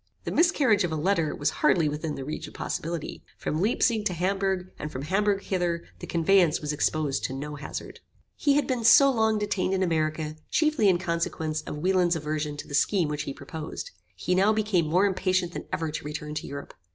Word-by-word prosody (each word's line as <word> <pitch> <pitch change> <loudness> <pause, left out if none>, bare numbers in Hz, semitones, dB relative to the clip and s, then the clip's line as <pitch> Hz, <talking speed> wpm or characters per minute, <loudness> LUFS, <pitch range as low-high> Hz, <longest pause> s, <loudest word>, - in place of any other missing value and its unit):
The - - -4
miscarriage 280 - +3
of 175 - -1
a - - -1
letter 165 -1 +1
was 145 0 0
hardly 165 -4 +4
within 150 +1 -3
the 135 - -6
reach 150 - -5
of - - -14
possibility. 165 -1 -4 0.2
From 155 - -2
Leipsig 220 +1 +2
to 190 - +1
Hamburgh, 190 +1 -1
and 150 - -5
from 130 - -5
Hamburgh 200 +4 +1
hither, 175 -3 -1 0.2
the - - -7
conveyance 170 -1 +3
was 150 0 -3
exposed 150 -1 0
to 130 - -3
no 145 +3 -5
hazard. 145 - -7 0.4
He 285 -1 +2
had 290 - +2
been 250 -3 -1
so 275 +4 +7
long 220 -3 +2
detained 195 -2 0
in 190 - +1
America 155 -2 -1
chiefly 305 -9 +3
in 180 - +4
consequence 165 -3 -2
of - - -4
Wieland's 180 +1 +2
aversion 150 -1 -3
to - - -7
the - - -10
scheme 165 +3 +2
which 150 0 -3
he - - -2
proposed. 155 +3 -7 0.2
He 180 - -1
now 195 +3 +4
became 210 -6 +1
more 180 +6 +3
impatient 185 -2 +1
than - - -6
ever 160 -2 -2
to 155 - -5
return 150 0 -5
to 150 - -4
Europe. 140 0 -7
170 Hz, 205 wpm, -27 LUFS, 155-195 Hz, 0.4 s, so